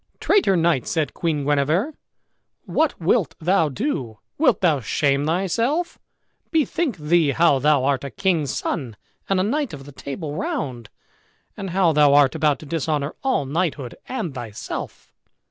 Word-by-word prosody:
"Traitor 375 - +3
knight," 165 -7 +1
said 155 -5 -1
Queen 155 -4 -1
Guenever, 150 - +1 0.7
"what 315 -2 0
wilt 180 +3 +1
thou 170 -1 +2
do? 135 - -3 0.2
Wilt 300 -3 +3
thou 160 -6 +3
shame 140 +4 0
thyself? 230 - 0 0.5
Bethink 315 - 0
thee 160 0 +2
how 165 -5 +4
thou 145 -1 +3
art 140 -1 +1
a 140 - -4
king's 170 -4 0
son, 125 -5 -3 0.3
and 195 -1 +2
a - - +2
knight 280 - -1
of 135 -2 -8
the 145 - -11
Table 145 +3 -6
Round, 120 -8 -4 0.7
and 195 -1 -5
how 175 -2 +2
thou 145 -1 +5
art 145 -2 +5
about 150 -2 +2
to - - -10
dishonor 150 -1 -2
all 265 - +1
knighthood 145 -4 -2
and 220 - -3
thyself?" 115 -5 -7
155 Hz, 150 wpm, -22 LUFS, 140-190 Hz, 0.7 s, thou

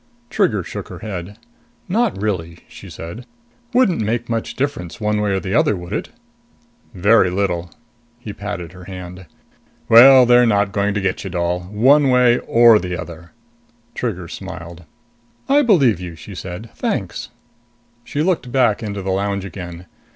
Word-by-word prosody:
Trigger 170 - +1
shook - - -7
her - - -9
head. 100 -1 -7 0.5
"Not 220 - 0
really," 85 -5 -3
she - - -12
said. 85 +10 -9 0.4
"Wouldn't 240 - +2
make 115 +3 -2
much 115 -1 -3
difference 120 -9 -3
one 105 -1 0
way 105 - 0
or 95 - 0
the 95 0 -4
other, 105 - +3
would 90 +1 -8
it?" - - -3 0.9
"Very 100 +1 +4
little." 90 -2 -2 0.5
He 110 -4 -8
patted 100 -5 -6
her 90 -1 -13
hand. 90 -1 -9 0.6
"Well, 130 +2 +9
they're 120 0 +5
not 100 -2 +2
going 100 +1 0
to 105 - -1
get 95 -1 -2
you, - - -5
doll 90 0 -1
one 135 +7 +4
way 125 -1 +4
or 115 -2 +5
the 90 -3 -4
other!" 85 -1 -10 0.6
Trigger - - -4
smiled. 85 0 -9 0.6
"I 280 +2 +4
believe 145 - +3
you," 90 -2 -7
she 90 +5 -11
said. 90 +4 -8
"Thanks." - - -3 0.7
She 145 +5 -2
looked 165 -8 -1
back 125 -6 +2
into 100 -3 -5
the 95 - -2
lounge 100 0 -1
again. 90 -2 -8
100 Hz, 160 wpm, -19 LUFS, 90-120 Hz, 0.9 s, Well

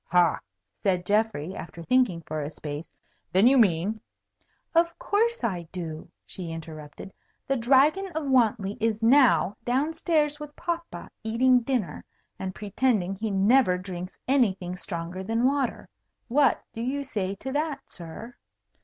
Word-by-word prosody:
"Ha!" 175 -2 +3 0.4
said 180 -2 +1
Geoffrey, 205 -5 0
after 170 0 -8
thinking 240 -5 +2
for 155 0 -3
a 145 - -3
space. 150 0 -7 0.4
"Then 190 +4 +4
you 260 +3 +6
mean 210 -2 +2 0.4
" - - -44
"Of 335 0 +2
course 465 0 0
I 175 -6 -2
do," 160 -4 -6 0.2
she 180 -3 -7
interrupted. 160 +2 -9 0.3
"The 275 - +1
Dragon 275 +10 +4
of 315 -3 -2
Wantley 220 -6 +2
is 225 0 0
now 225 - +5
down 270 +7 0
stairs 305 -2 +1
with 300 -1 -9
papa 340 -1 -5
eating 250 +3 +4
dinner, 245 -5 -2 0.4
and 190 -1 -4
pretending 205 -2 0
he 215 +3 -3
never 200 0 +4
drinks 185 0 -7
anything 195 -9 +1
stronger 175 0 -5
than 225 +4 0
water. 275 -1 0 0.4
What 275 0 +3
do 225 - -5
you 275 +4 -2
say 200 -8 -3
to 265 +7 -6
that, 290 0 -1
sir?" 175 +8 -9
220 Hz, 145 wpm, -26 LUFS, 180-270 Hz, 0.4 s, you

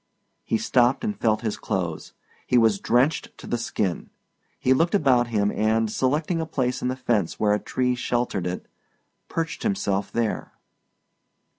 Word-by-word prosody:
He - - 0
stopped 130 - +2
and 210 -2 -1
felt 110 -2 +1
his 110 -3 -2
clothes. 85 -4 -3 0.3
He 125 - +3
was 110 -4 +4
drenched 125 +9 +1
to - - -11
the 120 - -2
skin. 100 -6 -2 0.5
He 130 - +3
looked 165 +8 +2
about 130 -9 +3
him 105 -3 +1
and, 110 0 +1
selecting 150 +8 0
a 160 - -3
place 130 -5 -1
in - - -1
the 130 - -1
fence 115 -9 -1
where 105 -1 +3
a 105 - +1
tree 125 +3 0
sheltered 120 -6 -1
it, 90 +1 -4 0.6
perched 165 0 -3
himself 100 - -1
there. 115 -2 -2
120 Hz, 160 wpm, -24 LUFS, 105-135 Hz, 0.6 s, was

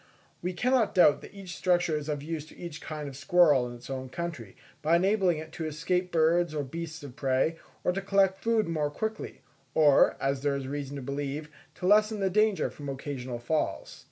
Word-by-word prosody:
We 180 +1 -2
cannot 245 +2 +2
doubt 165 -5 +6
that - - -11
each 190 -4 -8
structure 175 -3 +2
is 150 0 -4
of 145 -1 -2
use 155 -1 -4
to - - -16
each 170 -3 -7
kind 150 -2 -5
of 135 - -8
squirrel 145 -3 +4
in 120 - -8
its 120 +1 -12
own 130 -1 -5
country, 155 - -6 0.2
by 160 +2 +3
enabling 190 -1 +3
it 160 0 -8
to 160 - -5
escape 180 +4 -1
birds 165 0 +2
or 145 - -1
beasts 160 +3 -6
of 130 -3 -9
prey, 135 +4 +1 0.2
or - - +2
to 195 +2 -3
collect 195 -1 +2
food 225 -4 +2
more 155 -3 0
quickly, 220 +8 -5 0.3
or, 150 -3 +5
as 135 0 0
there 145 -1 +1
is 135 -1 -4
reason 140 0 -4
to 140 - -6
believe, 140 +2 -4 0.3
to 180 - -6
lessen 210 +2 +4
the 190 -1 +1
danger 215 0 +2
from 145 -1 -8
occasional 130 -2 -5
falls. 150 +6 -2
160 Hz, 205 wpm, -29 LUFS, 140-180 Hz, 0.3 s, doubt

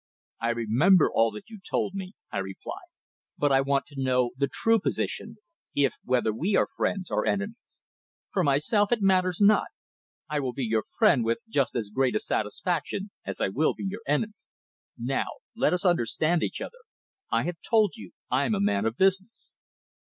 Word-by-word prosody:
"I 115 - 0
remember 120 - +4
all 115 0 +4
that 105 - -10
you 215 - -9
told 190 - -1
me," 190 0 -6 0.2
I - - -2
replied. 95 0 -7 0.5
"But 145 -1 +2
I 135 0 +5
want 140 0 +1
to 140 -2 -7
know 125 -2 +2
the 140 +1 0
true 225 0 +3
position, - - -2 0.4
if 140 -2 +3
whether 125 -3 +1
we 180 - 0
are - - +3
friends, 190 -3 -1
or - - 0
enemies? 205 +4 -3 0.5
For 185 - +2
myself, 165 - +2
it 230 -4 +1
matters 185 -2 +3
not. 210 +1 +5 0.6
I 150 -1 -1
will 130 -3 -2
be 130 0 -2
your 110 -1 +1
friend 205 - +3
with 115 +1 -1
just 140 - 0
as 105 -4 -2
great 130 +2 +1
a - - +3
satisfaction 175 - -2 0.2
as - - -4
I - - +1
will 145 +11 +1
be - - -7
your 200 +3 -4
enemy. 210 +9 +1 0.6
Now, - - -1 0.3
let - - +2
us 180 +2 0
understand 170 +1 +2
each - - -2
other. - - -7 0.5
I - - +2
have 175 0 -3
told 215 -4 +3
you, 225 - -11 0.2
I'm 220 - +2
a - - -1
man 105 - +1
of 110 +2 -3
business." 195 +3 0
155 Hz, 185 wpm, -27 LUFS, 125-195 Hz, 0.6 s, I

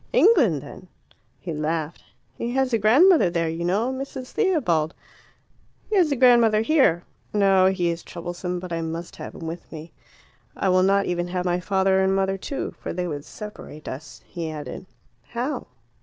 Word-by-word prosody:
"England, 240 - +4
then 185 - -11 0.3
" - - -41
He 170 - -5
laughed. 155 +1 -3 0.3
"He 235 - -3
has 265 -1 +1
a 230 - +3
grandmother 275 - +5
there, 170 -1 0
you 165 +1 -3
know 210 +9 0
Mrs. 265 -1 -6
Theobald." 230 - +1 1.0
"He - - +2
has 350 -6 +4
a - - +2
grandmother 235 -4 +5
here. 225 - +3 0.3
No, 195 -2 +5
he 180 -3 +1
is 170 0 -5
troublesome, 175 +1 -5
but 180 -1 -6
I 165 - -1
must 165 +1 -5
have - - -8
him 165 - -8
with 165 +2 -7
me. 160 0 -9 0.7
I 195 - +1
will 185 0 +4
not 195 +1 +3
even 175 0 -1
have 180 0 -3
my 175 0 +1
father 190 +1 +2
and 190 0 +2
mother 195 0 +1
too. 275 - -4
For - - -5
they 180 0 -2
would 145 -2 -5
separate 210 -8 -10
us," 130 -3 -8
he 165 -2 -5
added. 150 +3 -7 0.3
"How?" 250 +5 -4
185 Hz, 180 wpm, -24 LUFS, 165-230 Hz, 1.0 s, grandmother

